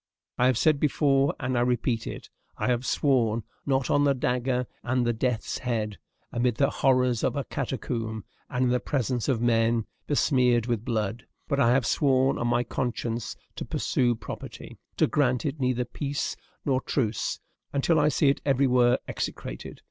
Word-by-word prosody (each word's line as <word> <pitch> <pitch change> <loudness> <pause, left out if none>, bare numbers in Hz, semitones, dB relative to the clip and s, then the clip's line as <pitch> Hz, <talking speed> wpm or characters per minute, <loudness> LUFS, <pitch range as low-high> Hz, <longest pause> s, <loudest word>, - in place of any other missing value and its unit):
I 125 - +5
have 130 -3 +3
said 155 +2 +3
before, 140 -1 +2
and 130 -1 -1
I 120 - +2
repeat 120 -1 0
it, - - -7 0.3
I - - -2
have 125 +1 0
sworn, 120 -6 +2 0.2
not 135 -2 +1
on 145 - +4
the 140 -1 +3
dagger 125 0 0 0.2
and 125 0 0
the 120 - +2
death's 120 0 -1
head, 110 -6 -2 0.3
amid 120 -1 +1
the 140 +3 +2
horrors 125 -3 +2
of - - +1
a 140 - -1
catacomb, 115 -6 -4 0.2
and 125 0 0
in - - +2
the 125 - +2
presence 125 -1 -1
of 120 -4 +1
men 115 -1 +2 0.2
besmeared 125 -5 +3
with 120 -3 -1
blood; 115 -1 -2 0.2
but 140 -2 0
I 120 -4 +5
have 125 -2 +2
sworn 135 +1 +2
on 120 - 0
my 120 0 +2
conscience 120 -1 -3 0.2
to - - -3
pursue 120 -2 +1
property, - - -8 0.2
to - - +5
grant 125 -5 +1
it 145 +1 -2
neither 125 -1 0
peace 140 +4 -3 0.3
nor 130 -2 +1
truce, 115 -6 -1 0.3
until 150 +3 +2
I 150 0 +4
see 145 -1 +3
it 140 - 0
everywhere 125 -3 +3
execrated. - - -5
125 Hz, 170 wpm, -27 LUFS, 120-135 Hz, 0.3 s, I